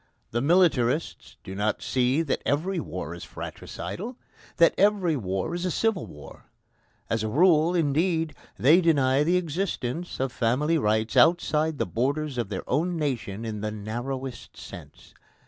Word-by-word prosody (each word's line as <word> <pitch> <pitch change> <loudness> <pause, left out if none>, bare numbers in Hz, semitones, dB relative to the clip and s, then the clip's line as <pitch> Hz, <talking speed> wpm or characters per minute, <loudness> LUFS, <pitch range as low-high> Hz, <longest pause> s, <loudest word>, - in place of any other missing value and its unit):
The 120 - 0
militarists 155 -3 +1
do 95 - -7
not 105 +2 -1
see 130 +5 +1
that 150 - -1
every 170 +6 0
war 90 - -5
is 85 - -9
fratricidal 235 +6 -7 0.4
that 170 -1 +6
every 195 -5 +3
war 95 - -2
is 175 0 -3
a 185 - 0
civil 215 +1 0
war. 75 - -13 0.6
As 115 - -1
a 110 - -1
rule, 165 - +4
indeed, 160 +1 +1 0.2
they 155 +8 +5
deny 140 -4 +3
the 175 +4 +3
existence 170 -3 -3
of 135 -1 -1
family 140 +8 +1
rights 110 -1 0
outside 160 -2 +3
the - - 0
borders 140 +2 -1
of 115 -5 -2
their 95 -3 -5
own 170 +6 0
nation 115 -8 -3
in 105 -2 -4
the 110 - -2
narrowest 120 +5 -6
sense. - - -12
145 Hz, 150 wpm, -26 LUFS, 115-170 Hz, 0.6 s, that